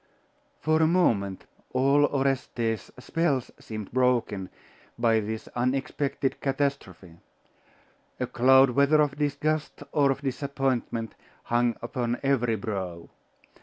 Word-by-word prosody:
For 155 +1 +2
a 160 - +5
moment 105 - +1 0.3
all 140 +3 +4
Orestes's 130 -6 -1
spells 140 -1 -1
seemed 110 -3 -7
broken 120 -7 +1 0.5
by 115 -2 +3
this 110 +1 -5
unexpected 135 +2 -1
catastrophe. 135 - -3 1.0
A 125 - 0
cloud, 130 +2 +5
whether 140 +4 +4
of 145 -2 +1
disgust 150 +1 -1
or 140 -2 +3
of 135 +1 -1
disappointment, 130 -4 -2 0.3
hung 120 -1 +1
upon 120 0 -2
every 125 -4 +2
brow. 95 -5 -5
130 Hz, 105 wpm, -27 LUFS, 115-140 Hz, 1.0 s, a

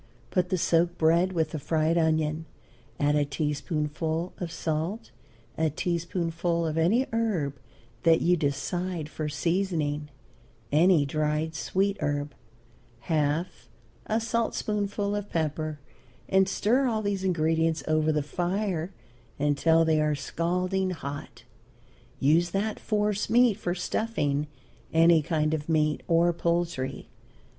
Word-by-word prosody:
Put 180 -1 +1
the 185 - +1
soaked 170 +1 +2
bread 170 +3 +3
with 160 -4 0
the 155 - -4
fried 160 +3 +1
onion, 160 -1 +1 0.5
add 145 0 +2
a 150 - +3
teaspoonful 155 +3 -2
of 175 -2 -4
salt, 165 +7 -3 0.5
a 160 -1 +3
teaspoonful 170 +1 -1
of 155 -1 -2
any 190 +11 +3
herb 175 -12 -1 0.4
that 165 -1 +5
you 180 +1 +3
decide 170 +2 -2
for 155 -1 -4
seasoning, 150 -2 -1 0.6
any 160 0 +5
dried 155 +2 -1
sweet 195 +5 0
herb, 145 0 -2 0.7
half 155 +3 -1 0.4
a 220 +1 +1
saltspoonful 210 -3 -1
of 205 0 -4
pepper, 155 -1 -2 0.5
and 190 0 +3
stir 245 +8 +2
all 220 -3 -1
these 200 -2 -1
ingredients 165 -2 +1
over 155 0 +2
the 150 -1 0
fire 180 +2 -2 0.5
until 155 +3 +3
they 160 -1 +3
are 150 -1 +1
scalding 180 +6 -1
hot. 145 -5 -7 0.8
Use 165 +5 +3
that 205 +4 -2
force 210 -2 0
meat 240 0 +5
for 180 -3 -3
stuffing 150 -7 -1 0.4
any 165 0 +5
kind 155 0 0
of 155 0 -3
meat 155 -2 +2
or 170 +1 +3
poultry. 170 -6 -2
165 Hz, 125 wpm, -27 LUFS, 155-185 Hz, 0.8 s, that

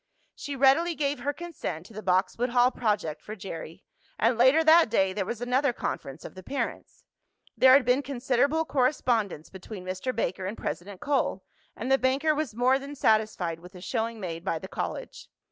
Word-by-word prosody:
She 285 - -6
readily 280 +6 +4
gave 285 -2 -1
her 280 +4 -1
consent 290 - -6
to 225 - -14
the 215 - -7
Boxwood 190 +6 +1
Hall 245 +1 +4
project 205 - -1
for 215 - -8
Jerry, 165 -5 -8 0.3
and 230 +2 +2
later 260 +7 +5
that 320 -3 +6
day 190 -4 +2
there 195 -1 -2
was 235 -1 -4
another 250 +2 +1
conference 135 - -5
of - - -8
the 185 - -10
parents. 275 +9 -5 0.5
There 260 0 +7
had 270 -2 +6
been 250 +3 +3
considerable 275 +3 0
correspondence 245 - 0
between 190 0 -9
Mr. 185 +7 -3
Baker 185 -5 -2
and 205 - -5
President 190 +1 -5
Cole, 275 -9 0 0.3
and 255 +4 -4
the 270 - +5
banker 275 +4 +2
was 295 -7 -3
more 255 +3 +3
than 280 +1 -8
satisfied 215 - +1
with 180 +3 -14
the 180 - -11
showing 225 +2 -2
made 170 -3 -5
by 170 -3 -1
the 190 - -8
college. - - -6
240 Hz, 185 wpm, -27 LUFS, 190-275 Hz, 0.5 s, There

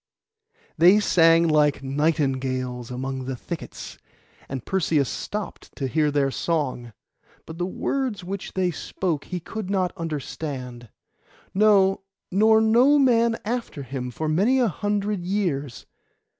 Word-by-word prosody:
They 185 +5 +7
sang 165 -4 +4
like 150 -3 +2
nightingales 135 -4 -1
among 130 +1 -4
the 130 0 -3
thickets, 165 +6 -8 0.5
and 130 -3 -5
Perseus 160 -7 +1
stopped 205 - -6
to 135 - -3
hear 150 +3 +1
their 140 -2 +1
song; 130 -8 -2 0.5
but 160 +1 -9
the 175 - -1
words 240 0 -2
which 190 +1 -6
they 185 -2 +1
spoke 160 -1 -3
he 180 - -4
could 205 +3 -6
not 185 -3 0
understand; 140 - -5 0.6
no, 195 -1 +4 0.3
nor 220 +3 +5
no 240 +6 +5
man 235 -4 +3
after 230 - -3
him 130 -1 -5
for 155 +6 -4
many 200 +12 +2
a 245 -4 +3
hundred 205 +2 -2
years. 175 - -2
165 Hz, 130 wpm, -24 LUFS, 135-205 Hz, 0.6 s, They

